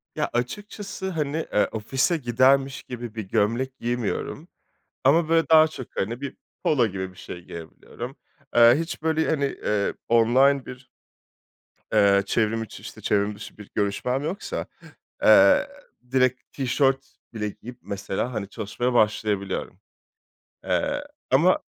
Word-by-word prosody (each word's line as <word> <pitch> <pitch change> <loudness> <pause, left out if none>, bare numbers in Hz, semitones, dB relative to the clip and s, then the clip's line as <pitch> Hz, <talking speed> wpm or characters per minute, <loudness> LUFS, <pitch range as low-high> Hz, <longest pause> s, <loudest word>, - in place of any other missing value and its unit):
Ya - - -1
açıkçası, 195 - -4
hani, 155 -4 -2 0.2
eee, 105 - +3
ofise 135 +10 0
gidermiş 135 +1 +2
gibi 120 -3 -7
bir 110 - -3
gömlek 115 +7 0
giymiyorum 120 -2 -3 0.6
ama 155 +4 +4
böyle 165 0 +3
daha 160 0 +7
çok, 130 -5 -8
hani, 120 +7 -2
bir 140 - -5 0.3
polo 125 -6 +3
gibi 95 -2 -5
bir 90 - -20
şey 90 - -8
giyebiliyorum. 85 +10 -9 0.4
Eee, 120 0 +8
hiç 165 -1 -4
böyle, 160 0 +1
hani, 145 -3 +1
eee, 105 -6 -1
online 130 +4 +4
bir, 125 0 -11 1.0
eee, 100 -2 +5
çevrim 110 +2 0
içi, - - -10
çevrim 100 0 +1
dışı 105 - -11
bir 105 -2 -12
görüşmem 115 +6 0
yoksa, 175 +7 -4 0.6
eee, - - +7 0.4
direkt 130 -1 +2
tişört 135 0 +1 0.3
bile 105 -2 -2
giyip 120 +4 -11
mesela, 100 +4 -3
hani, 100 -3 -4
çalışmaya 120 +4 -2
başlayabiliyorum. 105 -3 0 0.9
Eee, - - 0 0.3
ama - - +5
120 Hz, 130 wpm, -25 LUFS, 105-140 Hz, 1.0 s, Eee